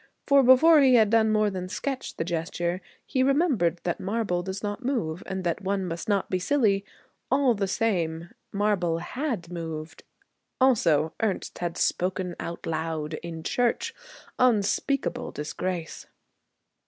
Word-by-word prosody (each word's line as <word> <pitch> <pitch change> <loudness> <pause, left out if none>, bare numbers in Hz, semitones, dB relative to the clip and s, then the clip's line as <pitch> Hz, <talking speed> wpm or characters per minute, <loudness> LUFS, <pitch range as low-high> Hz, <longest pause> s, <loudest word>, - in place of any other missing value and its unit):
For 280 -1 +6
before 285 +5 +7
he 260 -2 +6
had 220 -3 +5
done 220 -1 +4
more 215 -1 +2
than 185 -1 -5
sketch 265 +6 -4
the - - -2
gesture, 175 +1 -2 0.2
he 260 - 0
remembered 260 - +2
that 175 - -2
marble 200 -3 -1
does 190 +3 -5
not 205 +4 -4
move 185 - -1
and 190 -1 -3
that 175 +2 -1
one 195 0 -1
must 170 +2 -5
not 200 -2 +1
be 185 - -1
silly. 200 -3 +2 0.5
All 270 -1 +3
the 200 -2 -1
same, 175 -6 -1 0.2
marble 200 -5 +1
had 215 - -4
moved. 160 -2 -6 0.6
Also 165 - +3
Ernest 215 -4 -2
had 175 -1 -3
'spoken 180 -1 0
out 170 - -6
loud' 160 -1 -3
in 165 -2 -7
church. 245 +5 0 0.5
Unspeakable 250 +3 +1
disgrace! 165 +3 -4
190 Hz, 140 wpm, -26 LUFS, 170-235 Hz, 0.6 s, before